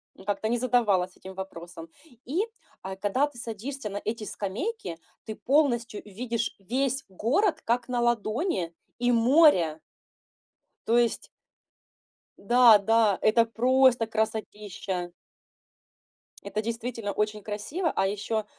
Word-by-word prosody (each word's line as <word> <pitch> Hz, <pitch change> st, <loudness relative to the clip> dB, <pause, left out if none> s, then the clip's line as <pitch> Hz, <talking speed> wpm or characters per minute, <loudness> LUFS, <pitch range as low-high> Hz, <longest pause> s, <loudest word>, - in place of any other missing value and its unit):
Ну, 190 Hz, -, -15 dB
как-то 205 Hz, +1 st, -1 dB
не 240 Hz, +2 st, 0 dB
задавалась 210 Hz, -8 st, +1 dB
этим 190 Hz, 0 st, -10 dB
вопросом. 175 Hz, -3 st, -8 dB, 0.4 s
И, 325 Hz, -, 0 dB, 0.4 s
э, 190 Hz, 0 st, -5 dB
когда 205 Hz, +8 st, +1 dB
ты 290 Hz, -5 st, -10 dB
садишься 235 Hz, +2 st, -5 dB
на 200 Hz, -, -4 dB
эти 220 Hz, 0 st, -3 dB
скамейки, 210 Hz, -, -4 dB, 0.3 s
ты 220 Hz, -, -5 dB
полностью 245 Hz, -6 st, +1 dB
видишь 230 Hz, +2 st, -3 dB
весь 265 Hz, +6 st, -1 dB
город, 260 Hz, -, +1 dB
как 235 Hz, +1 st, 0 dB
на 245 Hz, -1 st, -1 dB
ладони. 230 Hz, -, 0 dB, 0.2 s
И 245 Hz, 0 st, +2 dB
море 230 Hz, -, +4 dB, 1.1 s
то 230 Hz, -, +4 dB
есть 240 Hz, -1 st, +1 dB, 1.1 s
Да, 240 Hz, +1 st, +6 dB
да. 215 Hz, -1 st, +3 dB
Это 230 Hz, +2 st, +4 dB
просто 250 Hz, +1 st, +3 dB
красотища. 210 Hz, -4 st, -3 dB, 1.3 s
Это 205 Hz, +2 st, -3 dB
действительно 230 Hz, -1 st, -4 dB
очень 210 Hz, +1 st, -2 dB
красиво, 275 Hz, -, -2 dB
а 195 Hz, -, +2 dB
еще, 210 Hz, +2 st, -2 dB
225 Hz, 120 wpm, -27 LUFS, 200-245 Hz, 1.3 s, Да